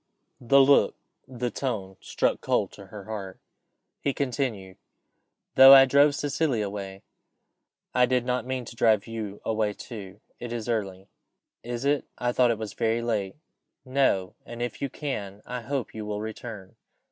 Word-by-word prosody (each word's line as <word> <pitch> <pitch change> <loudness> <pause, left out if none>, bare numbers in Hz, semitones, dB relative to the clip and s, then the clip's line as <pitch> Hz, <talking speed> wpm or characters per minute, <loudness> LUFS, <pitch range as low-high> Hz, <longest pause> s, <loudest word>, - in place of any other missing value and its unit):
The 135 +3 +4
look, 140 +1 +5 0.3
the 125 -2 -4
tone, 105 -8 -3
struck - - 0
cold - - 0
to 100 - -13
her 105 -1 -9
heart. 100 -3 -7 0.6
He 140 - -1
continued 120 -9 -3 0.8
"Though 135 +1 +10
I 135 0 +9
drove 140 +2 +4
Cecilia 140 -6 0
away, 100 -1 -7 0.9
I 125 -1 +4
did 125 -1 +1
not 125 0 0
mean 130 -1 -3
to 115 - -10
drive 110 -3 +3
you 110 -3 -6
away 110 -2 0
too. 100 -4 -9 0.2
It 120 -1 -6
is 120 -1 -4
early." 100 -5 -3 0.5
"Is 120 +2 -5
it? 145 0 +1
I 120 0 0
thought 125 0 +3
it 115 - +1
was 105 -2 -6
very 115 0 0
late." 105 -5 -2 0.5
"No 130 -9 +1
and 120 0 -9
if 120 -3 -5
you 140 - -1
can, 105 -9 -5
I 125 0 -5
hope 130 0 -3
you 110 - -6
will 105 0 -4
return." 110 -2 -8
115 Hz, 160 wpm, -26 LUFS, 105-130 Hz, 0.9 s, Though